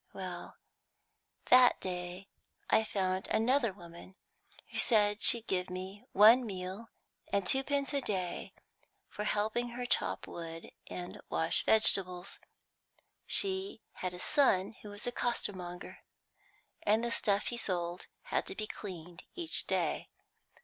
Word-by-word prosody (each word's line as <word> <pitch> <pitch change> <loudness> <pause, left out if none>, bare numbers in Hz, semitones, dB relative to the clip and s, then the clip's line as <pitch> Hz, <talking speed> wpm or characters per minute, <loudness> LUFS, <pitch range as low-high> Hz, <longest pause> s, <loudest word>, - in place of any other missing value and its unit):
Well, - - -7 1.0
that 250 -1 +7
day 180 +1 -5 0.4
I 220 - +5
found 190 -3 -1
another 240 0 +2
woman 175 0 -13 0.6
who - - -1
said 210 -2 +3
she'd 235 -1 +5
give 185 -3 -1
me 185 +2 -7
one 225 +5 +7
meal 195 +1 -6 0.4
and 200 -2 +1
twopence 275 +5 +1
a 280 - +1
day 185 -7 -3 0.6
for 210 - -5
helping 220 +4 0
her 250 - -3
to - - +4
chop 95 -2 -4
wood 165 -1 -8 0.2
and 180 0 -7
wash 160 0 0
vegetables; 190 -4 +3 0.9
she 385 - +2
had 180 -1 -5
a - - -9
son 195 -6 +3
who 210 - -9
was 205 0 -8
a 245 - -1
costermonger, 185 -8 -3 0.8
and 215 +2 +2
the 235 - -1
stuff 205 -3 +1
he 240 - -4
sold 175 -5 -3 0.2
had - - -1
to - - -6
be 215 - -3
cleaned 180 -4 -8
each 340 -2 -2
day. - - -1
200 Hz, 135 wpm, -32 LUFS, 180-235 Hz, 1.0 s, that